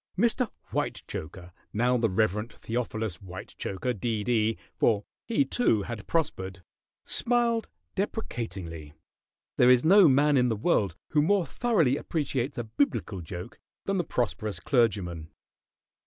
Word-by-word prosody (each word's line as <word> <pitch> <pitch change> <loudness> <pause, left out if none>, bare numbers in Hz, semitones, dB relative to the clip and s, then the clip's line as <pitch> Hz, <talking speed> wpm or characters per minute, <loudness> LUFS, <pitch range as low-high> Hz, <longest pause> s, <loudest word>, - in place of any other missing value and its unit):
Mr. 235 +3 +2 0.2
Whitechoker 85 +3 -4 0.2
now 125 +4 +2
the 115 -2 +2
Rev. 105 +3 +1
Theophilus 110 -6 -3
Whitechoker, 95 +4 -5
D.D., 110 0 0 0.2
for 105 -3 +2 0.2
he, 235 +4 +2
too, 115 - +2
had 115 -2 -6
prospered 95 - -2 0.4
smiled 235 -1 +2 0.2
deprecatingly. 95 - -4 0.6
There 125 - +6
is 125 +1 +5
no 195 +1 +8
man 145 +1 +4
in 125 -1 +3
the 115 - +1
world 105 - +1
who 150 - +3
more 185 +3 +3
thoroughly 165 - +2
appreciates 140 -5 -2
a 120 - -1
biblical 110 -4 -1
joke 90 +6 -8 0.3
than 195 0 0
the - - +1
prosperous 105 - -2
clergyman. 90 - 0
120 Hz, 125 wpm, -28 LUFS, 100-150 Hz, 0.6 s, no